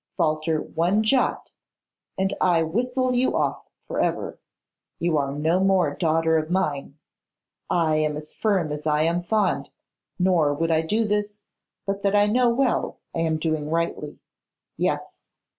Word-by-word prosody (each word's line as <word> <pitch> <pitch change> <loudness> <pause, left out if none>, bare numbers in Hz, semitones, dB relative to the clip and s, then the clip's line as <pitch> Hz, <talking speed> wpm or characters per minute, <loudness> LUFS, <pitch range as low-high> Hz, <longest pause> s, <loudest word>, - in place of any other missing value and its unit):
Falter 155 -2 +1
one 175 +9 0
jot 255 +4 +1 0.7
and 190 +1 0
I 170 -3 +3
whistle 250 +9 0
you 250 +1 +1
off - - -2 0.2
for - - -3
ever. - - -1 0.6
You 170 -2 0
are 140 -1 -1
no 160 +5 +1
more 190 -6 +2
daughter 160 0 +2
of 155 0 -5
mine. 150 -6 -1 0.7
I 160 -3 +2
am 155 -1 0
as 150 0 -7
firm 190 -8 0
as 150 +1 -4
I 150 0 +2
am 170 +2 +1
fond; 175 -7 0 0.5
nor 175 -6 +2
would 165 +2 0
I 160 0 +3
do 215 +8 0
this, 210 0 -2 0.4
but 195 0 -2
that 200 0 +1
I 205 0 +5
know 240 +4 +3
well 250 +1 0 0.2
I - - -3
am 160 -1 +1
doing 155 -1 -2
rightly. 165 -2 -2 0.6
Yes! - - 0
170 Hz, 155 wpm, -24 LUFS, 155-205 Hz, 0.7 s, I